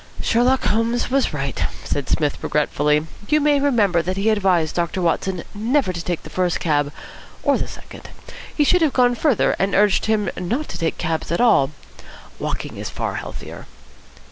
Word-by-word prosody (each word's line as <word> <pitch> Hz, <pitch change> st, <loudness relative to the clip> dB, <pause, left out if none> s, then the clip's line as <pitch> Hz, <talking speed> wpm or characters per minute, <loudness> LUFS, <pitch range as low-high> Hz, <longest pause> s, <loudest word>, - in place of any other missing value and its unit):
"Sherlock 250 Hz, +3 st, +2 dB
Holmes 230 Hz, +3 st, 0 dB
was 275 Hz, 0 st, +2 dB
right," 140 Hz, -2 st, -3 dB, 0.2 s
said 140 Hz, -2 st, -3 dB
Psmith 150 Hz, -2 st, 0 dB
regretfully. 150 Hz, 0 st, +1 dB, 0.2 s
"You 305 Hz, -, +4 dB
may 295 Hz, -1 st, +3 dB
remember 215 Hz, -11 st, +2 dB
that 185 Hz, +3 st, -3 dB
he 205 Hz, +3 st, +2 dB
advised 185 Hz, -6 st, +2 dB
Doctor 170 Hz, +1 st, -1 dB
Watson 180 Hz, +1 st, 0 dB
never 225 Hz, 0 st, 0 dB
to 170 Hz, -1 st, -5 dB
take 175 Hz, -1 st, -3 dB
the -, -, -10 dB
first 180 Hz, -2 st, 0 dB
cab, 145 Hz, -3 st, +1 dB, 0.5 s
or -, -, +3 dB
the -, -, -2 dB
second. -, -, -11 dB, 0.5 s
He 300 Hz, -, +3 dB
should 360 Hz, +5 st, +3 dB
have 310 Hz, -4 st, +2 dB
gone 245 Hz, -1 st, +4 dB
further, 255 Hz, -1 st, +2 dB
and 195 Hz, +1 st, +1 dB
urged 205 Hz, +1 st, +3 dB
him 215 Hz, -2 st, +1 dB
not 235 Hz, -, -3 dB
to -, -, -6 dB
take 165 Hz, -1 st, -1 dB
cabs 165 Hz, -2 st, -2 dB
at 170 Hz, -, 0 dB
all. 220 Hz, -, +4 dB, 0.7 s
Walking -, -, -4 dB
is -, -, -5 dB
far -, -, -3 dB
healthier." -, -, -8 dB
195 Hz, 175 wpm, -21 LUFS, 165-245 Hz, 0.7 s, You